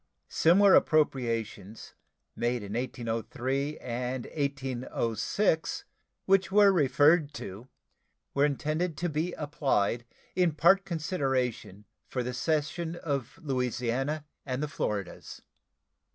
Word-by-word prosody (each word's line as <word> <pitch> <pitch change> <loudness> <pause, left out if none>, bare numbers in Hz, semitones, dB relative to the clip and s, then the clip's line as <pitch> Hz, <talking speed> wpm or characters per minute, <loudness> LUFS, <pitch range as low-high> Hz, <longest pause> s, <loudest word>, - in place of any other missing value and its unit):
Similar 190 +4 +5
appropriations 115 - +1 0.4
made 120 -1 -1
in 100 0 -6
1803 130 +4 -2
and 125 +1 -4
1806, 140 - -1 0.4
which 190 0 +3
were 205 0 +6
referred 150 -1 +3
to, 105 0 -8 0.7
were 140 - +2
intended 155 +3 0
to 175 +1 -1
be 160 +4 -2
applied 135 -6 0 0.3
in 180 -3 +3
part 190 +6 +4
consideration 135 - -2 0.2
for 125 - -2
the 125 +1 -4
cession 160 +5 -1
of 140 -8 -3
Louisiana 130 +2 -1 0.2
and 130 +1 -3
the - - -1
Floridas. 105 - -4
140 Hz, 100 wpm, -29 LUFS, 120-160 Hz, 0.7 s, were